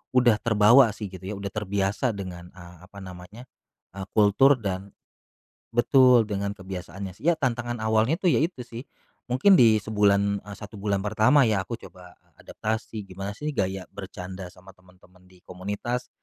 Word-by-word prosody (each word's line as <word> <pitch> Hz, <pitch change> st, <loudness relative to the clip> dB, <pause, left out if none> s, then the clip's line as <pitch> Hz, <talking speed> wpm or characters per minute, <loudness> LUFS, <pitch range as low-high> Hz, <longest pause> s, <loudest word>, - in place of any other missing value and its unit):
udah 120 Hz, -4 st, +4 dB
terbawa 110 Hz, +1 st, +5 dB
sih 105 Hz, -3 st, -7 dB
gitu 95 Hz, 0 st, -10 dB
ya, 105 Hz, -, -4 dB
udah 100 Hz, 0 st, -6 dB
terbiasa 100 Hz, +3 st, -1 dB
dengan, 90 Hz, -3 st, -8 dB
eee, 90 Hz, -1 st, -13 dB
apa 100 Hz, 0 st, -13 dB
namanya, 90 Hz, +6 st, -11 dB, 0.5 s
eee, 95 Hz, 0 st, -7 dB
kultur 110 Hz, +7 st, +5 dB
dan 100 Hz, -3 st, -5 dB, 0.8 s
betul 125 Hz, -1 st, +5 dB
dengan 100 Hz, -1 st, -3 dB
kebiasaannya 95 Hz, 0 st, -7 dB
sih. 160 Hz, -, -5 dB
Ya 170 Hz, -, +3 dB
tantangan 120 Hz, -3 st, -2 dB
awalnya 110 Hz, +8 st, +2 dB
itu 190 Hz, -, -7 dB
ya -, -, +3 dB
itu 160 Hz, -7 st, -2 dB
sih. 120 Hz, +1 st, -9 dB, 0.5 s
Mungkin 145 Hz, +11 st, +5 dB
di 110 Hz, -3 st, +6 dB
sebulan, 100 Hz, -1 st, +2 dB
eee, 100 Hz, -, -8 dB
1 105 Hz, -1 st, -10 dB
bulan 100 Hz, -1 st, -1 dB
pertama 110 Hz, +7 st, +4 dB
ya 105 Hz, -4 st, +1 dB
aku 115 Hz, -, -4 dB
coba 90 Hz, -2 st, -14 dB, 0.3 s
adaptasi 110 Hz, -1 st, -4 dB
gimana 95 Hz, +2 st, -7 dB
sih 150 Hz, 0 st, -3 dB
gaya 95 Hz, -3 st, -2 dB
bercanda 95 Hz, -1 st, -8 dB
sama 95 Hz, +1 st, -16 dB
temen-temen 90 Hz, 0 st, -23 dB
di 90 Hz, -1 st, -22 dB
komunitas, 105 Hz, +7 st, -5 dB
100 Hz, 165 wpm, -25 LUFS, 95-115 Hz, 0.8 s, di